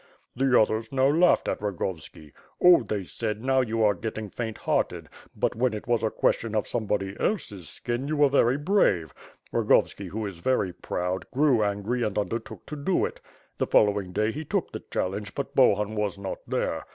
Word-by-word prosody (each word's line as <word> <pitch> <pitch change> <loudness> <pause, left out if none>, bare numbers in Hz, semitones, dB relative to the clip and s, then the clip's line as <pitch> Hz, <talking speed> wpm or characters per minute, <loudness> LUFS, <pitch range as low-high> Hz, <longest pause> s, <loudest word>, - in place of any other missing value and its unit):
The 130 0 +4
others 110 +1 +1
now 135 0 +3
laughed 170 +4 +4
at - - -2
Rogovski. 85 -6 -5 0.3
'Oh,^ 175 - +6
they 100 -2 -2
said, 110 +3 -4
'now 130 0 +3
you 115 -2 0
are 105 -1 +5
getting 110 +1 -5
faint 115 -2 -4
hearted; - - -1 0.3
but, - - 0
when 120 -1 +1
it 105 - -7
was 120 -2 +1
a 110 - +1
question 110 +1 0
of 105 - +1
somebody 100 -4 -2
else's 105 - -2
skin, 120 +3 -3
you 155 0 -1
were 145 0 +6
very 135 -2 +3
brave.' 145 - +2 0.4
Rogovski, - - +2
who 110 +1 -4
is 95 -4 -6
very 95 -3 0
proud, 90 +1 -3
grew 130 -4 +3
angry, 105 +4 -1
and 105 -3 -1
undertook 110 +2 -4
to 150 - -6
do 150 +6 +1
it. - - -7 0.4
The - - +1
following 100 -3 +3
day 105 +4 0
he 150 +6 -5
took - - -2
the - - -6
challenge, 100 +3 -3
but 140 - -4
Bahun 105 -5 +4
was 105 -3 -2
not 100 -1 -5
there. - - -1
110 Hz, 190 wpm, -26 LUFS, 100-130 Hz, 0.4 s, Oh,^